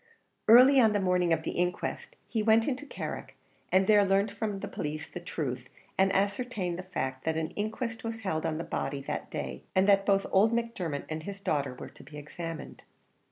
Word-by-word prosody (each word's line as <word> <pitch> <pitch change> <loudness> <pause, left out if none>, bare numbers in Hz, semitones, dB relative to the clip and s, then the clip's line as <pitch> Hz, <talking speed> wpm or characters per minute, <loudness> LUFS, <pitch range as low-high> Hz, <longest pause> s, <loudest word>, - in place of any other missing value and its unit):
Early 255 +4 +8
on 220 -2 +4
the 205 - +2
morning 180 -2 +2
of 165 - +2
the - - -2
inquest, 180 - -2
he 225 - -1
went 225 +1 +4
into 285 +1 -2
Carrick, - - -6 0.4
and 190 +1 +4
there 210 0 +6
learnt 195 +2 +2
from 205 -1 -3
the - - -4
police 150 +1 -4
the - - -7
truth, 130 -7 -4 0.3
and 190 0 +3
ascertained 200 -3 -1
the 185 0 -9
fact 130 -6 -3
that 160 0 0
an 160 -1 -2
inquest 225 +2 -3
was 225 -1 -4
held 160 -6 -1
on 160 -1 -1
the 165 - -3
body 140 -4 -3
that - - -4
day, 65 -2 -5
and 190 +1 +4
that 195 -1 +4
both 195 -1 +3
old 205 +4 +5
Macdermot 230 -11 -2
and 155 0 -4
his 200 +4 -7
daughter 140 -8 -1
were - - -8
to - - -16
be 150 - -11
examined 165 +2 -7
at - - -19
it. - - -36
190 Hz, 210 wpm, -29 LUFS, 160-215 Hz, 0.4 s, Early